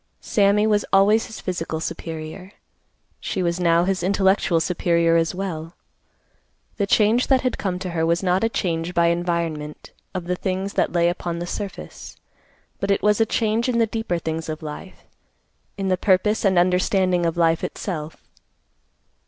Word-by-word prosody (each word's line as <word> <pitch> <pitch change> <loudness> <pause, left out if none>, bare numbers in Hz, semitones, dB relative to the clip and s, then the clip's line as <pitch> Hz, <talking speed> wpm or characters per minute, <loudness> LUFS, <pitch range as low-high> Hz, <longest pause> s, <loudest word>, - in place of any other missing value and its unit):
Sammy 205 0 +2
was 210 -1 +2
always 205 +3 +4
his 220 - -9
physical 165 -3 -3
superior. 165 +4 -6 0.7
She 185 - -3
was 170 0 -1
now 170 -1 +3
his 185 0 0
intellectual 190 -2 +2
superior 170 -1 +1
as 165 +1 +1
well. 170 -3 -5 1.0
The 200 - 0
change 220 +4 +3
that 265 -2 +3
had 255 -2 -2
come 185 -3 -2
to 185 -1 -5
her 165 -1 -1
was 170 +3 +1
not 185 +2 +2
a 225 - +2
change 170 -4 -2
by 170 0 +4
environment 170 -3 -3 0.2
of 180 -2 -3
the 180 +1 -1
things 190 +2 -3
that - - +1
lay 170 -1 +2
upon 175 -1 -2
the 170 - -4
surface, 195 +2 -7 0.6
but 200 - -2
it 200 - +1
was 210 +1 +3
a 225 - +3
change 225 +3 0
in 240 - +1
the 230 - +4
deeper 225 -5 -2
things 160 -1 -4
of 155 0 -5
life—in 190 +4 -10
the 185 - +2
purpose 205 +3 +2
and 190 -2 +3
understanding 180 0 +2
of 165 - -2
life 165 -1 +2
itself. 160 -5 -5
180 Hz, 165 wpm, -22 LUFS, 170-200 Hz, 1.0 s, always